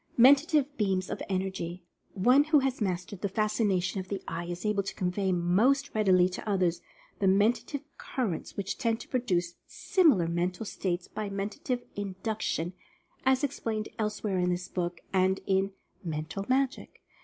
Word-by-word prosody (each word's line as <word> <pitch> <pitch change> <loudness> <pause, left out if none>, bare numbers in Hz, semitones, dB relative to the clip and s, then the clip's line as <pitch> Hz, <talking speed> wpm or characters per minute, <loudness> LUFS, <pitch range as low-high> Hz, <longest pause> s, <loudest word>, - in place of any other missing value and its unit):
MENTATIVE 285 +3 +5
BEAMS 190 -3 0
OF - - -4
ENERGY. 185 -2 -3 0.3
One 250 +9 +5
who 305 0 +4
has 260 -2 -1
mastered 180 -1 -2
the 200 - 0
Fascination 205 -3 +1
of 185 - -6
the 195 0 -4
Eye, 165 +1 -3
is 175 +3 -5
able 210 -1 +2
to 195 - -6
convey 190 0 0
most 210 +12 +2
readily 185 -4 +4
to 185 +3 -6
others 180 -4 +1 0.4
the 195 - +2
Menta 205 +5 +4
tive 285 -2 -5 0.2
Currents 225 -11 -3
which 200 -1 -3
tend 230 -3 +1
to - - -10
produce 180 -9 -1
similar 295 - +3
mental 180 +4 -1
states 180 -3 -2
by 210 -1 -4
Mentative 205 +5 -3
Induction, 195 -3 -2 0.5
as 265 +1 +4
explained 225 -6 -2
elsewhere 210 -3 -1
in 180 0 +2
this 180 0 -2
book, 175 -1 -3
and 190 0 +3
in 195 0 +1 0.3
"Mental 160 +3 -4
Magic." 265 +1 -1
195 Hz, 155 wpm, -29 LUFS, 180-230 Hz, 0.5 s, MENTATIVE